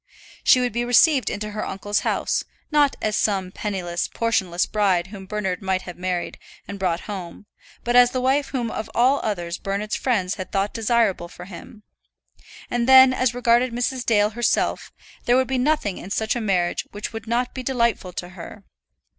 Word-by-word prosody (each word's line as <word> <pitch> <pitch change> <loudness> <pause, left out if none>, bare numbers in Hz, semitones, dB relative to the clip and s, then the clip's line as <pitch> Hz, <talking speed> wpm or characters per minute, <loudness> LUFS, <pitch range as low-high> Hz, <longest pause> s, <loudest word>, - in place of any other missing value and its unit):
She 255 - +6
would 250 -2 -1
be 240 +1 0
received 255 +1 +4
into 210 +1 -4
her 215 +1 -4
uncle's 205 +2 -2
house, - - -1 0.3
not 295 -2 +3
as 215 -1 0
some 190 -3 0
penniless, 185 -4 -3
portionless 190 -7 0
bride 195 -5 +1
whom 195 -2 -9
Bernard 190 -3 -3
might 190 -1 -1
have 180 - -8
married 180 -1 -3 0.3
and 200 - -7
brought 180 -2 0
home, 190 -1 -8 0.4
but 240 0 0
as 245 0 +7
the 255 - -2
wife 270 +2 +1
whom 240 -5 -3
of 220 - -5
all 260 +4 +4
others 175 -5 -3
Bernard's 200 +2 -3
friends 190 -8 0
had 185 - -8
thought 195 +1 -1
desirable 225 -5 +1
for 180 +1 -11
him. 200 +4 -12 0.8
And 240 +1 -1
then, 260 0 +8
as 255 -2 0
regarded 240 0 +2
Mrs. 245 +1 -1
Dale 210 -2 +2
herself, 240 +2 0 0.3
there 245 +1 +4
would 260 -1 +2
be 260 -1 -1
nothing 255 -8 0
in 185 - -9
such 220 +3 -1
a 240 - -2
marriage 185 -5 0
which 205 +2 -6
would 225 0 -7
not 245 +2 -1
be 260 - -5
delightful 235 -7 0
to 175 0 -6
her. 185 +3 -11
215 Hz, 185 wpm, -23 LUFS, 190-245 Hz, 0.8 s, then